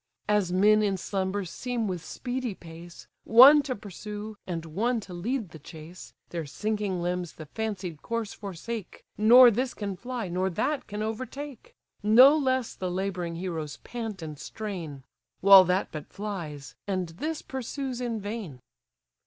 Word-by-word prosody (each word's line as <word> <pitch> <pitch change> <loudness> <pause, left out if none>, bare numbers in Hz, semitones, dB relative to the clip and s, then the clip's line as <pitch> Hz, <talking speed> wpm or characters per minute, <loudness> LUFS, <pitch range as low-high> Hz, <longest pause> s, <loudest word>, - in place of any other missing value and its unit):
As 205 -4 +2
men 210 +4 +5
in 200 -2 +1
slumbers 190 0 -2
seem 245 -3 -2
with 180 -3 -4
speedy 245 +3 -4
pace, 170 0 -12 0.2
One 265 +6 +9
to 275 -3 -3
pursue, 210 +1 -7
and 165 -3 -4
one 225 +10 0
to 190 - -10
lead 220 +4 -2
the 160 - -12
chase, 160 +4 -11 0.2
Their 165 -3 -4
sinking 205 +2 -2
limbs 180 -1 -2
the 155 - -10
fancied 185 -3 -5
course 230 -3 -3
forsake, 205 +1 -7
Nor 240 +4 +8
this 250 +4 -1
can 200 -2 -4
fly, 245 +1 -5
nor 185 +2 0
that 280 - -1
can 210 +1 -4
overtake: 255 +4 -6 0.3
No 250 +8 +8
less 260 -5 0
the 185 - -4
labouring 180 -2 -3
heroes 165 -4 -4
pant 225 -7 -5
and 155 -3 -7
strain: 170 -10 -6 0.4
While 195 -1 +9
that 180 +2 0
but 155 -2 -7
flies, 170 -9 -6
and 185 -3 -1
this 300 - -4
pursues 265 0 -4
in 235 -3 -2
vain. 205 - -6
200 Hz, 155 wpm, -27 LUFS, 175-235 Hz, 0.4 s, One